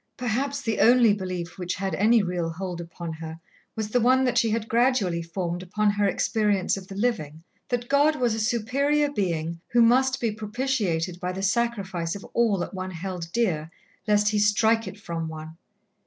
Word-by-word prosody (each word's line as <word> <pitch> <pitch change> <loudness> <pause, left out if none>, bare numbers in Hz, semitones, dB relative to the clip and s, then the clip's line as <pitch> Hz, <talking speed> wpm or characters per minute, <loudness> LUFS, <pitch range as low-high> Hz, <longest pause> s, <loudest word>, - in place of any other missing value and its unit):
Perhaps 270 +4 -2
the 225 -3 -1
only 240 -2 +6
belief 185 -2 -5
which 180 -1 -2
had 190 -1 -3
any 215 +5 +4
real 175 -2 -2
hold 175 +1 -5
upon 170 0 -7
her 160 0 -8 0.4
was 220 -2 -3
the 245 - +2
one 255 +3 +4
that 250 -2 +1
she 230 - +3
had 220 0 -1
gradually 230 -8 +2
formed 170 +1 -4
upon 205 +3 +1
her 205 0 +1
experience 205 0 +1
of 190 -1 -8
the 195 - -9
living 165 -9 -2 0.3
that 245 -1 -2
God 290 +3 +3
was 245 -5 +1
a 220 - -2
Superior 275 +7 +1
Being 170 - -2
who 240 - +5
must 260 +3 +3
be 230 -2 0
propitiated 210 -6 -2
by 180 0 -2
the 190 +1 -5
sacrifice 195 -6 -1
of 200 - -8
all 230 -4 +2
that 175 - -4
one 185 0 -4
held 180 -1 -6
dear, 175 -9 0 0.4
lest 210 0 +3
He 210 -1 +1
strike 220 +2 +3
it 205 - -8
from 165 -4 -4
one. 160 0 -8
205 Hz, 185 wpm, -25 LUFS, 175-235 Hz, 0.4 s, only